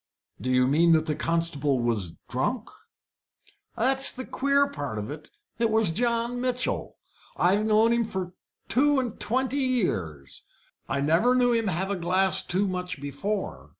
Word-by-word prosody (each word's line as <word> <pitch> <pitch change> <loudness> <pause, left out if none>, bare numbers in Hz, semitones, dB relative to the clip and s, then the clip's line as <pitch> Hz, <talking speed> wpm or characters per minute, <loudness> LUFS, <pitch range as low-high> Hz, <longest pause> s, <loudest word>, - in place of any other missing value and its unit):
"Do 130 - -3
you 125 0 +3
mean 165 +5 +4
that 160 -1 +3
the 155 - -1
constable 150 -5 0
was 110 -8 -1
drunk?" - - -2 1.1
"That's 265 +3 +3
the 255 0 -7
queer 280 +1 +2
part 145 - -5
of 105 +5 -5
it. 150 +1 -9 0.3
It 230 -1 +2
was 220 -5 +3
John 235 +4 -1
Mitchell. 250 0 -2 0.4
I've 200 +5 +2
known 220 +2 +4
him 235 0 +2
for 190 -4 -5 0.3
two 285 +2 +3
and 245 -4 -4
twenty 255 +6 -1
years. 95 - -2 0.5
I 140 +1 -1
never 170 - +3
knew 245 -1 +3
him 230 -2 +1
have 190 +2 -1
a - - 0
glass 185 +2 +2
too 190 +3 0
much 180 -4 -4
before. 165 +9 -4
190 Hz, 155 wpm, -26 LUFS, 150-240 Hz, 1.1 s, mean